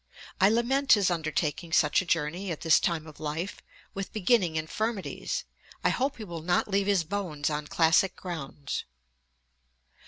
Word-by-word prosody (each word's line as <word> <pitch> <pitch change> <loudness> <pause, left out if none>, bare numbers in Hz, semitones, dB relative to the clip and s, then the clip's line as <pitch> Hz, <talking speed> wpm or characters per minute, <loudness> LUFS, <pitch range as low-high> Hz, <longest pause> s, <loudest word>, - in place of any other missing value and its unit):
I 190 +1 +6
lament 255 +5 +3
his 200 -4 +4
undertaking 160 0 -2
such 155 0 +4
a 185 - -9
journey 170 +4 -1
at 165 - -5
his 165 -2 +6
time 165 -2 -1
of 155 -2 -13
life, 155 +5 -4 0.3
with 195 -1 -5
beginning 200 -5 +2
infirmities. 220 - -2 0.4
I - - +4
hope 270 +2 0
he 225 - -7
will 170 -5 -6
not 175 +2 +1
leave 200 0 +1
his 200 -4 +3
bones 160 -5 -2
on 150 0 -3
classic 165 +4 +3
grounds.' 145 -6 -5
175 Hz, 155 wpm, -28 LUFS, 155-205 Hz, 0.4 s, I